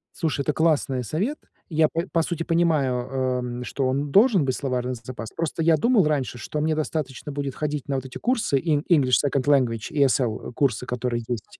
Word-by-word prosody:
Слушай, 160 Hz, -4 st, -1 dB
это 150 Hz, +2 st, 0 dB
классное 150 Hz, -5 st, +1 dB
совет. 200 Hz, -, -2 dB, 0.3 s
Я, 160 Hz, -1 st, +3 dB
п 165 Hz, +3 st, -2 dB
по 165 Hz, -, +2 dB
сути, 165 Hz, 0 st, -2 dB
понимаю, 165 Hz, -6 st, +2 dB, 0.2 s
э, 130 Hz, -1 st, 0 dB
м, 125 Hz, 0 st, -4 dB
что 135 Hz, +1 st, -2 dB
он 140 Hz, +2 st, -1 dB
должен 200 Hz, -, +5 dB
быть 130 Hz, -1 st, 0 dB
словарный 125 Hz, -3 st, -2 dB
з 120 Hz, -, -9 dB
запас. 115 Hz, -2 st, -7 dB
Просто 165 Hz, 0 st, -2 dB
я 165 Hz, 0 st, +5 dB
думал 230 Hz, 0 st, +3 dB
раньше, 140 Hz, -5 st, -1 dB
что 150 Hz, +5 st, -4 dB
мне 155 Hz, +1 st, +1 dB
достаточно 150 Hz, -3 st, -3 dB
будет 140 Hz, -2 st, -4 dB
ходить 150 Hz, -2 st, -3 dB
на 140 Hz, -, -1 dB
вот 135 Hz, -1 st, -3 dB
эти 130 Hz, -, -8 dB
курсы, 235 Hz, -, +1 dB
En 150 Hz, -1 st, 0 dB
english 135 Hz, -7 st, +5 dB
Second 140 Hz, -1 st, 0 dB
Language, 125 Hz, -6 st, +2 dB
и 145 Hz, -, +3 dB
SL 125 Hz, -5 st, 0 dB
курсы, 130 Hz, -3 st, 0 dB
которые 120 Hz, -1 st, -2 dB
есть. 120 Hz, -3 st, -6 dB
140 Hz, 205 wpm, -24 LUFS, 125-160 Hz, 0.3 s, должен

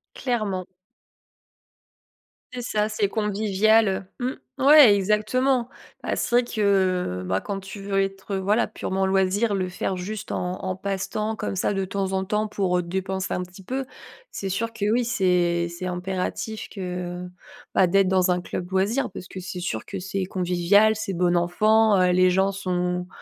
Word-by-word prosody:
Clairement. 210 Hz, -8 st, -2 dB, 1.9 s
C'est 250 Hz, -, -4 dB
ça, 215 Hz, -3 st, 0 dB
c'est 215 Hz, -2 st, 0 dB
convivial, 215 Hz, 0 st, +2 dB
heu, 190 Hz, +1 st, -2 dB, 0.2 s
mmh. 260 Hz, -, -1 dB, 0.2 s
Ouais 275 Hz, -6 st, +8 dB
exactement. 235 Hz, +6 st, +1 dB, 0.3 s
Bah, -, -, -2 dB
c'est -, -, -2 dB
vrai 245 Hz, -, +5 dB
que, 185 Hz, -, +1 dB
bah, 95 Hz, +1 st, 0 dB
quand 195 Hz, -1 st, -4 dB
tu 195 Hz, +1 st, -9 dB
veux 195 Hz, 0 st, 0 dB
être, 195 Hz, +1 st, -4 dB
heu, -, -, 0 dB
voilà, 205 Hz, +5 st, +2 dB
purement 190 Hz, -2 st, -2 dB
loisir, 195 Hz, +3 st, +2 dB
le 185 Hz, -2 st, 0 dB
faire 185 Hz, +1 st, -3 dB
juste 205 Hz, +4 st, -5 dB
en 180 Hz, +1 st, -3 dB
en 185 Hz, 0 st, -2 dB
passe 195 Hz, 0 st, -3 dB
temps, 215 Hz, +2 st, -2 dB
comme 195 Hz, -, -4 dB
ça, 200 Hz, -, +1 dB
de 195 Hz, 0 st, -1 dB
temps 195 Hz, 0 st, -2 dB
en 190 Hz, 0 st, 0 dB
temps, 210 Hz, +2 st, -1 dB
pour, 190 Hz, -3 st, 0 dB
heu, -, -, +1 dB
te 170 Hz, -, -10 dB
dépenser 190 Hz, +1 st, -2 dB
un 180 Hz, -, -1 dB
petit 180 Hz, +1 st, -13 dB
peu. 260 Hz, +3 st, -3 dB, 0.5 s
C'est 195 Hz, -, -5 dB
sûr 225 Hz, +4 st, -2 dB
que 225 Hz, -3 st, -3 dB
oui, 245 Hz, +1 st, +2 dB
c'est 180 Hz, -6 st, +1 dB
c'est 170 Hz, +2 st, -6 dB
impératif 185 Hz, +4 st, -3 dB
que 180 Hz, -1 st, -5 dB, 0.5 s
bah, 185 Hz, -, +4 dB
d'être 195 Hz, +2 st, +3 dB
dans 185 Hz, -1 st, +3 dB
un 180 Hz, -, +1 dB
club 180 Hz, +1 st, -6 dB
loisir 200 Hz, +8 st, +1 dB
parce 185 Hz, -, -9 dB
que 185 Hz, -, -8 dB
c'est 180 Hz, 0 st, -6 dB
sûr 110 Hz, -11 st, -3 dB
que 195 Hz, -, -6 dB
c'est 195 Hz, +1 st, -3 dB
convivial. 185 Hz, +4 st, +3 dB
C'est 205 Hz, -3 st, -4 dB
bon 175 Hz, 0 st, +2 dB
enfant, 210 Hz, +4 st, +3 dB
heu, 180 Hz, -, +4 dB
les 185 Hz, 0 st, +4 dB
gens 190 Hz, +2 st, +2 dB
sont 180 Hz, -2 st, -2 dB
195 Hz, 180 wpm, -24 LUFS, 180-215 Hz, 1.9 s, Ouais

